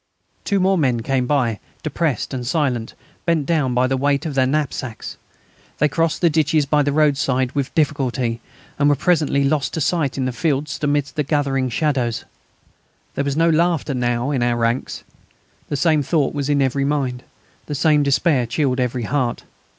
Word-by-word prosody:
Two 200 -2 +1
more 190 0 +2
men 125 -6 +1
came 130 +1 0
by, 120 -7 +1 0.2
depressed 155 -5 -1
and 125 -2 -4
silent, 130 -6 -1 0.3
bent 165 -4 +2
down 145 -7 0
by 125 +1 +3
the 135 +1 0
weight 140 +2 0
of 155 - -3
their 130 -1 +2
knapsacks. 130 -5 -3 0.6
They 150 - +3
crossed 165 +2 0
the 170 - +5
ditches 155 -1 +2
by 150 +1 +2
the 145 0 +1
roadside 135 -4 +1
with 140 -2 -3
difficulty, 130 -6 0 0.4
and 145 0 +4
were 145 - +4
presently 155 -3 +1
lost 140 0 0
to - - -2
sight 145 -4 0
in 130 - -1
the 130 - -1
fields 150 +2 -1
amidst 145 0 -1
the - - +2
gathering 135 -3 0
shadows. 125 -4 -1 0.9
There 140 - -1
was 140 0 -2
no 165 +1 +4
laughter 165 -3 +1
now 120 +1 -1
in 135 -4 0
our 120 0 +1
ranks. 115 +2 -1 0.7
The 145 - -1
same 155 +2 +3
thought 145 0 0
was 145 -1 -2
in 140 -1 +3
every 135 +1 0
mind, 135 -3 -1 0.5
the 150 - -3
same 150 +1 +3
despair 140 -2 +2
chilled 130 +1 0
every 125 -1 -1
heart. 125 0 -1
140 Hz, 180 wpm, -20 LUFS, 130-150 Hz, 0.9 s, the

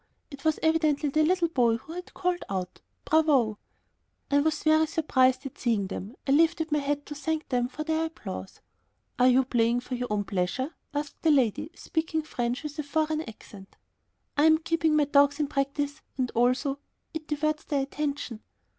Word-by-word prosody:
It 275 -1 -10
was 315 -1 +2
evidently 315 -2 +2
the 310 +3 +2
little 345 +2 +3
boy 240 -7 +3
who 315 +7 -11
had 360 +1 -8
called 360 -1 -1
out 185 -2 -4 0.2
"Bravo!" 280 -9 +3 0.7
I 285 - +5
was 305 +1 0
very 315 0 +4
surprised 260 -4 +2
at 275 - -8
seeing 225 -5 +1
them. 200 +4 -6
I 270 - 0
lifted 320 +1 +3
my 300 - +3
hat 290 0 -2
to 295 - -7
thank 315 +1 -3
them 245 -2 +1
for 305 +4 -6
their 320 +1 0
applause. 325 +1 -7 0.6
"Are 250 - +6
you 255 +1 +5
playing 240 -1 +2
for 250 - -7
your 250 0 -2
own 210 -1 0
pleasure?" 205 - -2 0.2
asked 290 0 -4
the 325 - +3
lady, 290 +1 +2
speaking 320 -2 -2
French 245 -1 -2
with 300 0 -6
a - - 0
foreign 310 +1 0
accent. 205 -2 -14 0.6
"I 290 - +4
am 315 0 +6
keeping 325 -1 +1
the 295 - +4
dogs 285 +1 +4
in 300 - +2
practice 285 +1 -2 0.2
and 255 -2 -1
also... 255 +4 +1 0.3
it 315 -1 -6
diverts 305 0 -1
their 280 -2 0
attention." 280 -5 -4
290 Hz, 180 wpm, -27 LUFS, 250-315 Hz, 0.7 s, Are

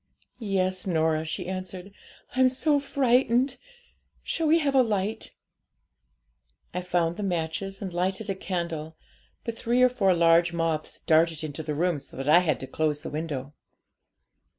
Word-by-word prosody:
'"Yes, 185 -4 -1
Norah," 160 -2 +1
she 175 +3 -4
answered. 185 0 -6 0.4
"I'm 260 0 +5
so 285 +3 +2
frightened; 260 -1 +2 0.7
shall 325 - -1
we 320 +2 +5
have 290 -4 0
a 265 - +6
light?" 215 -1 -2 1.4
'I 180 - -2
found 175 -2 0
the - - -4
matches 185 +1 -3
and 185 -3 -5
lighted 190 +4 -1
a 195 - 0
candle; 170 -4 -4 0.5
but 230 - -4
three 240 +2 +2
or 255 - +6
four 195 -7 +2
large 170 0 +4
moths 165 -2 -2
darted 160 0 +2
into 155 0 -5
the 150 -1 -4
room, 170 0 +1
so - - -14
that 135 +1 -4
I 155 +4 +7
had 170 -4 0
to - - -4
close 150 0 -1
the - - -7
window. 145 -3 -4
180 Hz, 155 wpm, -26 LUFS, 160-220 Hz, 1.4 s, I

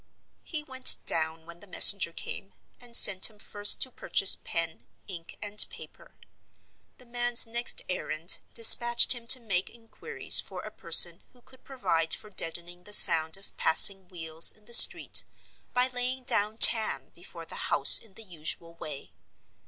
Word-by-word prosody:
He 310 -3 -8
went 260 -2 0
down 160 0 -6
when 170 +1 -17
the 205 - -20
messenger 185 -1 +1
came, 195 +3 -11 0.3
and 240 -1 -4
sent 190 0 +3
him 215 - -26
first 205 0 +1
to 260 - -9
purchase 195 - 0
pen, 165 -1 -9 0.2
ink, 170 -4 -13
and 205 0 +2
paper. - - -17 0.8
The 250 - -22
man's 240 0 -3
next 235 +1 -4
errand 170 -2 -5 0.2
dispatched 235 +1 +4
him 235 -2 -14
to 255 - +4
make 195 -6 -7
inquiries 235 - -2
for - - -12
a - - -13
person - - +1
who 250 - -28
could 260 -1 -26
provide 165 -12 -6
for 215 - -14
deadening 175 0 -5
the 210 - -10
sound 160 -3 +4
of 195 - -17
passing 190 +3 +4
wheels 160 -2 +2
in 215 - -20
the 235 - -15
street - - +4 0.5
by 250 0 -2
laying 255 +1 -8
down 215 -2 -5
tan 225 -1 +4
before - - -16
the - - -11
house - - +5
in 210 -4 -17
the 225 - -13
usual 165 -2 -10
way. 150 -4 -14
205 Hz, 160 wpm, -23 LUFS, 170-240 Hz, 0.8 s, house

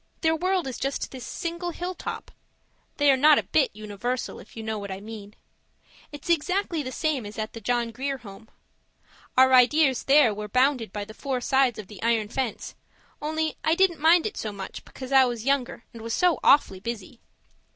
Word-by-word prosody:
Their 320 -1 +3
world 365 +1 0
is 260 -2 -5
just 275 +1 -3
this 260 -2 -8
single 340 +1 -4
hilltop. 355 +1 -6 0.7
They 290 -1 +5
are - - +4
not 295 +3 +6
a - - +1
bit 285 -4 +2
universal, 215 +4 -4
if - - -15
you 225 - -5
know 220 -1 -3
what 200 0 -7
I 190 0 -5
mean. 210 -1 -10 0.8
It's 290 -2 -10
exactly 345 +1 0
the 255 -2 -5
same 305 -4 -1
as 205 0 -9
at 215 0 -4
the 230 - -8
John 240 +1 0
Grier 270 +4 -3
Home. 220 -2 -13 0.9
Our 260 0 +6
ideas 260 +1 +4
there 275 -5 +5
were 210 +1 -6
bounded 255 -1 +1
by 205 0 -5
the 215 - -11
four 265 +1 -3
sides 265 -1 +2
of 215 - -7
the 200 0 -12
iron 225 -2 +1
fence, 255 -2 -3 0.5
only 315 +1 -2
I 315 - +3
didn't 375 -2 +2
mind 325 +2 +5
it 430 - -4
so 215 - -3
much 195 -1 -8
because 260 0 -9
I 265 -1 +7
was 240 -2 -4
younger, 270 -4 0
and 230 - -10
was 230 0 -3
so 355 -2 +2
awfully 195 -9 +4
busy. 230 +2 -7
255 Hz, 195 wpm, -26 LUFS, 220-300 Hz, 0.9 s, I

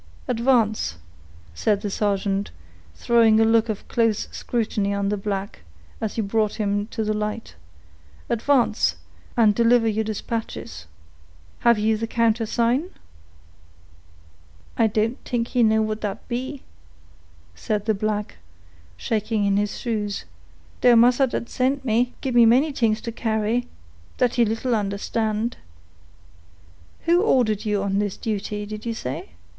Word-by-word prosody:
"Advance," 230 - +1 0.6
said 200 - 0
the 205 -2 -3
sergeant, 200 -1 0 0.5
throwing 225 - +4
a 225 - +5
look 225 0 +3
of 215 - -4
close 230 -3 +1
scrutiny 210 -4 -1
on 200 0 0
the 210 - 0
black, 200 0 -4 0.4
as 220 -2 -3
he 225 - 0
brought 215 +1 0
him 205 -1 -1
to 225 -1 -3
the 215 0 0
light; 210 +1 -4 0.7
"advance, 230 - +2 0.4
and 220 -3 +5
deliver 235 +1 +4
your 220 0 0
dispatches. 215 - -5 0.7
Have 235 -1 +4
you 215 +1 +1
the 225 +1 -3
countersign?" 230 +6 +1 1.9
"I 225 - +3
don't 220 +3 -1
t'ink 235 -1 -2
he 250 - +1
know 220 -1 +4
what 215 0 -3
dat 205 -2 -5
be," 260 +3 -4 0.9
said 210 -3 -3
the 220 - +2
black, 210 - -2 0.6
shaking 215 - -1
in 200 0 +2
his 205 0 -1
shoes, 210 -4 -3 0.6
"dough 245 -1 +6
massa 245 +3 +5
dat 235 - -4
sent 265 +2 -1
me 245 +1 +1
gib 265 -3 -2
me 240 -1 +7
many 270 +6 +4
t'ings 225 -4 +1
to 230 - -5
carry, 225 +1 -1 0.5
dat 245 -1 +2
he 240 - +3
little 225 +3 -1
understand." 215 +2 -1 1.4
"Who 345 +2 +3
ordered 240 - +2
you 205 -2 0
on 200 0 0
this 205 -2 -2
duty, 210 -1 -3
did 215 +1 -7
you 230 -1 -3
say?" 125 - -6
220 Hz, 140 wpm, -23 LUFS, 210-235 Hz, 1.9 s, me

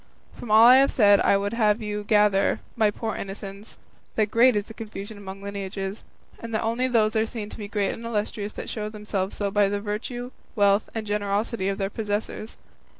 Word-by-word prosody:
From 240 - -9
all 215 +1 +7
I 250 +2 +9
have 275 +1 +5
said 205 -4 +5
I 200 - +4
would 200 +2 -2
have 215 -2 +2
you 210 -1 -4
gather, 205 -2 +3 0.2
my 220 -2 +3
poor 220 +1 -4
innocents, 195 +1 -8 0.4
that 215 -1 +1
great 245 +1 +5
is 205 -1 0
the 225 - -11
confusion 215 -1 -8
among 195 -1 -9
lineages, 195 0 -5 0.4
and 230 -1 -5
that 220 - 0
only 230 +3 0
those 225 -3 +2
are 220 0 +2
seen 215 -2 -6
to - - -9
be 205 - -5
great 205 -1 0
and 230 - -8
illustrious 210 -2 -3
that - - -7
show 210 -1 -4
themselves 210 -2 -3
so 200 -1 -2
by 205 -1 +3
the 205 0 -1
virtue, 240 +4 -5 0.2
wealth, 200 -1 +3
and 220 -1 -3
generosity 205 0 -1
of 195 - -2
their 195 -1 -2
possessors. 215 +1 -4
210 Hz, 205 wpm, -25 LUFS, 200-225 Hz, 0.4 s, I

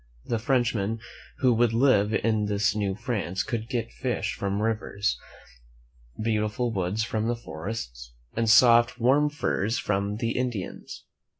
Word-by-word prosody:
The 115 - -1
Frenchmen 115 -3 0 0.4
who 130 -2 +5
would 115 0 +2
live 115 -4 +3
in 110 -1 +1
this 105 +1 +1
New 100 -3 -1
France 105 -6 -2
could 115 0 -4
get 115 -3 -2
fish 125 -2 -2
from 100 0 -2
the 105 - -1
rivers, 105 -2 -1 1.0
beautiful 110 +2 0
woods 100 +1 -1
from 110 0 -2
the 120 - 0
forests, 80 - -7 0.2
and 115 -1 +1
soft, 120 +1 +6
warm 140 +5 +4
furs 115 -7 -1
from 100 0 -1
the 115 +1 -1
Indians. 120 -7 -4
110 Hz, 140 wpm, -26 LUFS, 100-120 Hz, 1.0 s, soft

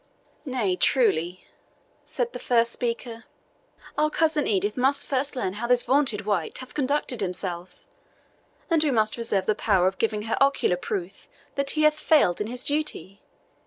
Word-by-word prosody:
"Nay, 240 -9 0
truly," 180 -6 +1 0.6
said 480 -1 -3
the - - -6
first 235 -1 +2
speaker, 230 -1 -4 0.7
"our 305 0 +3
cousin 310 -2 +1
Edith 205 +1 0
must 265 +3 +2
first 275 +1 -1
learn 190 -7 -2
how 235 - -1
this 245 0 +4
vaunted 255 -7 +1
wight 195 -7 -1
hath 255 -1 -9
conducted 280 -4 -1
himself, 180 -1 -4 0.9
and 330 -3 +3
we 305 - +2
must 220 -4 +1
reserve 230 -5 -1
the 215 - +2
power 195 -4 +2
of 190 +1 0
giving 215 -2 0
her 225 +4 -2
ocular 275 -9 +3
proof 185 +1 -5 0.3
that 280 0 0
he 305 - +3
hath 305 0 +3
failed 290 - +3
in 210 - -2
his 250 +2 -5
duty. 285 - -2
235 Hz, 160 wpm, -25 LUFS, 195-275 Hz, 0.9 s, this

